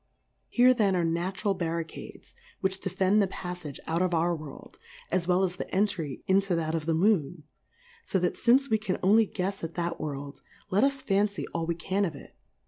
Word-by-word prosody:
Here 250 +1 +5
then 205 -6 +2
are 175 - +1
natural 180 +5 -1
Barri 170 -2 -2
cades, - - -11 0.3
which 190 0 -1
defend 195 +3 +2
the 200 - +2
Paffage 180 -6 -6
out 165 +2 0
of 180 -2 +1
our 170 +1 +2
World, 150 -3 -11 0.3
as 175 -2 0
well 180 +1 +3
as 180 -1 -1
the - - -5
Entry 185 -8 -1
into 195 -1 +2
that 160 -1 -1
of 160 -1 -2
the 165 - +2
Moon; 170 -4 +1 0.6
fo 190 - 0
thatfince 240 +9 +3
wecaa 215 -5 0
only 215 +3 +5
guefs 195 +1 -3
at 165 0 -5
that 175 0 -2
World, 145 -1 -5 0.3
let 195 +3 +3
us 275 -1 +1
fancy 200 +1 +1
all 165 0 -3
we 170 - 0
can 190 +4 -1
of 165 -6 -2
it. 140 - -13
180 Hz, 190 wpm, -28 LUFS, 165-200 Hz, 0.6 s, Here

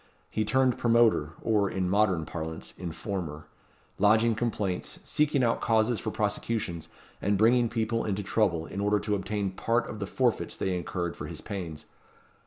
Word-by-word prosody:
He 110 - 0
turned 130 +3 +2
promoter, 115 -10 +3
or, 105 -3 +2
in 95 -1 -1
modern 95 -4 +2
parlance, 80 0 -5
informer; 85 -3 -5 0.5
lodging 110 +3 +5
complaints, 110 -5 -2
seeking 150 -3 +2
out 115 -1 +1
causes 110 0 +2
for 110 - -3
prosecutions, 105 -5 -2 0.3
and 100 0 +2
bringing 120 +3 +4
people 115 0 0
into 105 -1 -2
trouble 95 -5 +1
in 100 - -5
order 105 +1 +3
to 105 +1 -2
obtain 100 0 -1
part 115 +5 0
of 110 - -7
the 100 - -3
forfeits 125 +2 0
they 95 -1 -1
incurred 85 0 -3
for - - -6
his - - -8
pains. 85 -7 -6
105 Hz, 160 wpm, -28 LUFS, 90-115 Hz, 0.5 s, lodging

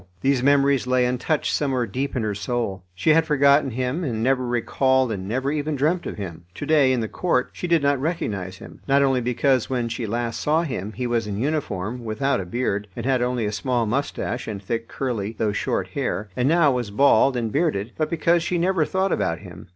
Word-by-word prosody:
These 135 -2 +2
memories 140 -1 +3
lay 130 -1 +3
untouched 125 +5 0
somewhere 130 -4 0
deep 130 +8 -3
in 120 - 0
her 105 -1 -1
soul; 100 -2 -3
she 95 - +2
had 165 +1 +5
forgotten 140 -1 +4
him, 130 +7 -2
and 115 -7 -2
never 130 0 +1
recalled 130 +1 +1
and 95 -3 -4
never 130 +6 -1
even 150 0 -1
dreamt 155 +6 0
of - - -6
him. 85 -5 -7
To - - -5
day, 145 -4 +4
in 125 -2 +1
the 110 - -2
court, 125 -2 0
she 180 - -4
did 170 -3 +3
not 140 -2 +2
recognise 100 - -3
him, - - -13
not 140 0 +4
only 135 -2 +2
because 125 +1 +1
when 120 -3 -1
she 120 -1 -3
last 115 +1 -2
saw 155 +3 +2
him 110 - -4
he 125 - -4
was 120 -2 0
in 100 -1 -3
uniform, 120 -5 -2
without 115 +3 0
a 90 - -7
beard, 105 -1 -1
and - - -5
had 130 -2 +2
only 125 -2 0
a 105 - -1
small 120 +2 0
moustache 125 +1 -2
and 105 -3 -4
thick, 115 +3 -3
curly, 115 -6 -3
though 110 -2 +1
short - - -1
hair, 105 +1 -3
and 125 +2 +1
now 165 -3 +4
was 125 -4 -2
bald 130 +3 +4
and 115 -2 -2
bearded, 140 - 0
but 155 - -1
because 170 +1 +2
she 175 +1 -1
never 175 -1 +2
thought 190 +2 0
about 85 -2 0
him. 90 -1 -12
125 Hz, 220 wpm, -23 LUFS, 110-140 Hz, -, had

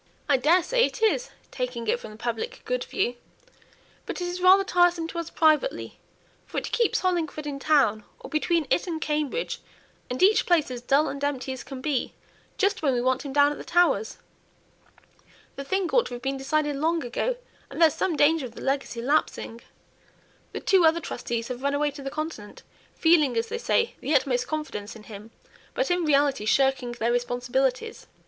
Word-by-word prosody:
"I 285 - +4
daresay 360 - +3
it 450 - -7
is, - - +2 0.2
taking 250 -2 -4
it 240 - +1
from - - -9
the 215 - -12
public 450 - -4
good - - -1
view. 245 -11 -1 0.9
But - - -4
it's 355 0 -3
rather 375 +2 +7
tiresome 350 -3 +2
to 340 - -4
us 335 - -5
privately, 315 +9 +1 0.5
for - - -7
it - - -3
keeps 470 -2 +1
Hollingford 330 -5 -1
in 285 -2 -4
town 275 -8 +2 0.2
or - - -9
between 330 +1 0
it 350 - +1
and 330 -2 -3
Cambridge 305 - -2 0.5
and 250 +5 -1
each 415 +3 +4
place 330 -7 +2
as 245 -1 -5
dull 275 +5 +2
and 280 0 -5
empty 270 -2 -2
as 260 - -8
can 265 -2 -8
be, 280 -3 -2 0.4
just 400 0 +1
when 280 -4 +2
we 240 - 0
want 255 +1 +1
him 280 - -6
down 285 +1 +4
at 295 - -6
the - - -7
Towers. 275 -12 +2 1.4
The 275 - -5
thing 380 +6 -1
ought - - +3
to 245 - -6
have 245 - -10
been 270 0 -1
decided 295 +1 -1
long 325 +2 0
ago, 365 - -1 0.3
and - - -8
there's 325 -3 +6
some 355 -4 -1
danger 295 -2 +3
of 235 - -16
the - - -9
legacy 270 -4 -2
lapsing. 250 -4 -1 0.9
The - - -6
two 380 -3 +4
other 325 +1 +4
trustees 235 -6 -4
have 250 0 -5
run 280 +1 0
away 295 0 +1
to 285 0 -10
the 275 - -4
Continent, 310 -8 -6 0.3
feeling, 305 -7 +3
as 230 - -1
they 465 - -3
say, 470 -1 +1
the 300 - 0
utmost 250 -2 +1
confidence 300 -10 -5
in 220 - -12
him, 210 0 -11 0.5
but - - 0
in 355 -1 +1
reality 280 -6 +2
shirking 255 +1 +2
their 235 0 -1
responsibilities. 250 - -1
290 Hz, 190 wpm, -26 LUFS, 250-340 Hz, 1.4 s, rather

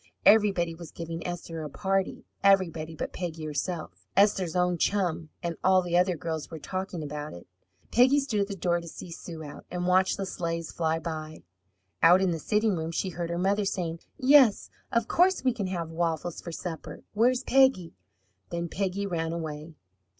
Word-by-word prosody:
Everybody 200 -6 +5
was 165 -1 -10
giving 165 0 -6
Esther 170 -2 -5
a 150 - -5
party, 195 +5 -1 0.2
everybody 165 -5 +3
but - - -4
Peggy 165 -3 -4
herself. 155 +2 -4
Esther's 195 -4 +3
own 180 -1 +2
chum, 175 -5 0
and 170 -1 -2
all 185 0 +5
the 175 -1 -1
other 180 -1 +3
girls, 160 -2 -4
were 160 - -7
talking 185 +1 -4
about 150 0 -5
it. 85 - -11 0.5
Peggy 260 +4 +5
stood 255 -7 -1
at 200 - +1
the 200 - -5
door 175 -2 0
to 170 - -10
see 170 +1 -9
Sue 165 -1 -8
out, 145 - -9
and 180 0 -3
watched 185 +1 +3
the 195 - -2
sleighs 165 -3 -3
fly 160 -1 0
by. 155 -1 -6 0.6
Out 175 +3 +7
in 190 -2 +2
the 165 - -2
sitting 210 +4 +1
room 160 -1 -3
she 175 +3 -2
heard 170 -1 -4
her 170 - -2
mother 200 +3 +2
saying, 175 -4 -2 0.2
"Yes, 265 -5 +5 0.2
of 235 -1 +1
course 370 -1 +3
we 255 -2 +3
can 205 -5 -3
have 170 -3 -3
waffles 165 0 -2
for 170 - -7
supper. 165 0 -6
Where's 245 +4 +3
Peggy?" 260 -12 +3 0.6
Then 170 0 -3
Peggy 195 +2 -2
ran 165 -4 -2
away. 160 -1 -5
175 Hz, 185 wpm, -28 LUFS, 165-195 Hz, 0.6 s, Out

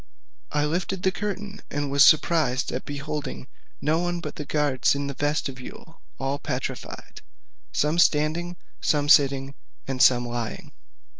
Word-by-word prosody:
I 150 0 +1
lifted 180 +4 -2
up - - -19
the 190 - +3
curtain, 205 0 -5
and 145 -1 -2
was 140 0 +6
surprised 155 -4 +3
at 125 - -4
beholding 145 -2 -5 0.3
no 155 +3 +2
one 175 0 -1
but 170 - -6
the 150 - -5
guards 145 -3 +1
in 140 0 -2
the 140 - -3
vestibule 145 +2 -4 0.2
all 135 +1 -2
petrified; 130 -1 -5 0.5
some 150 +3 +1
standing, 165 +3 +2 0.3
some 145 -2 +1
sitting, 135 -2 +4 0.3
and 130 -1 -2
some 120 -2 +5
lying. 120 -2 -5
145 Hz, 145 wpm, -25 LUFS, 135-165 Hz, 0.5 s, was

